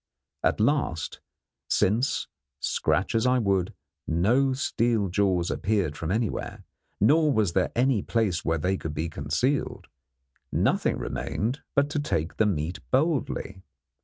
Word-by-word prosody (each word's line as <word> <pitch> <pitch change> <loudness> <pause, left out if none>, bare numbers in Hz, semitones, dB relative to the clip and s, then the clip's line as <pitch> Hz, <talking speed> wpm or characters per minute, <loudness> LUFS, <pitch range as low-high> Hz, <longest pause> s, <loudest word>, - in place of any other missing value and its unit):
At - - +2
last, 110 - 0 0.5
since, 115 +8 +1 0.3
scratch 80 +9 0
as 115 +2 +2
I 130 0 +4
would, 100 -3 0 0.3
no 120 +12 +2
steel 115 -5 0
jaws 95 -2 +1
appeared 100 -8 0
from 80 +1 -4
anywhere, 110 +2 -2 0.4
nor 150 +8 +4
was 105 -8 +1
there 95 0 +1
any 125 -3 +2
place 105 -7 0
where 80 0 +1
they 90 +5 0
could 80 -3 -5
be 80 +2 -2
concealed, 125 - -1 0.7
nothing - - +1
remained 120 +7 -3
but 140 0 +4
to 150 - 0
take 85 - -2
the 110 - +3
meat 85 -2 -2
boldly. 130 - 0
105 Hz, 135 wpm, -26 LUFS, 85-125 Hz, 0.7 s, I